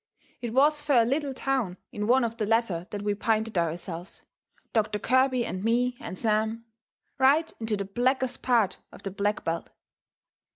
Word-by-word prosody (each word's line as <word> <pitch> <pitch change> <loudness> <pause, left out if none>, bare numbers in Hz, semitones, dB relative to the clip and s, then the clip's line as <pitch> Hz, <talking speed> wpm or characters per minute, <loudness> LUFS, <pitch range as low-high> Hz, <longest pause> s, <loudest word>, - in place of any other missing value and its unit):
It 240 -2 -3
was 295 +4 +4
fur 280 -6 +4
a - - 0
little 280 +3 0
town 255 -10 -1
in 210 0 -3
one 255 +2 +4
of 230 0 -2
the 215 -3 -1
latter 205 -6 +1
that 205 -1 -5
we 205 0 +1
pinted 220 +1 0
ourselves, 170 +1 -3 0.5
Doctor 215 -2 +1
Kirby 255 +2 +2
and 185 +1 -4
me 245 +2 +2
and 185 - -6
Sam 220 +1 0 0.5
right 290 +5 +4
into 220 -2 -1
the 200 - -3
blackest 255 +5 0
part 230 -7 +2
of - - -14
the 195 - -4
black 205 +2 -1
belt. 165 0 -2
225 Hz, 170 wpm, -27 LUFS, 205-255 Hz, 0.5 s, was